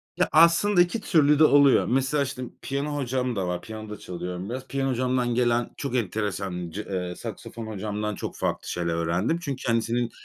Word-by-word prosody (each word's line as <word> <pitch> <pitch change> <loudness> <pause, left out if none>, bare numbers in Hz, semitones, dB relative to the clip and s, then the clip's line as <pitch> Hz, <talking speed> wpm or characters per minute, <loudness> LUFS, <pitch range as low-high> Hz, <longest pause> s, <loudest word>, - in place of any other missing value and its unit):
Ya, - - +1
aslında 170 +4 +5
iki 180 +5 +1
türlü 150 -3 +4
de - - +7
oluyor. 140 -2 +6
Mesela, 135 +3 +1
işte, 130 -1 -5 0.2
piyano 140 +2 -2
hocam 130 -3 -1
da 95 -2 -1
var. 90 0 -2
Piyano 110 -1 -8
da 105 - -6
çalıyorum 90 +2 -6
biraz. 130 +2 -5
Piyano 135 -1 -1
hocamdan 125 -1 0
gelen 120 -1 +2
çok 140 -3 -3
enteresan, 95 -5 -2
ce 105 +6 -5
eee, 90 -2 -3
saksafon 115 -1 -7
hocamdan 105 0 -3
çok - - -6
farklı - - -2
şeyler 85 -1 -2
öğrendim. 85 - 0
Çünkü 140 -5 -4
kendisinin 115 0 0
120 Hz, 180 wpm, -26 LUFS, 100-140 Hz, 0.2 s, de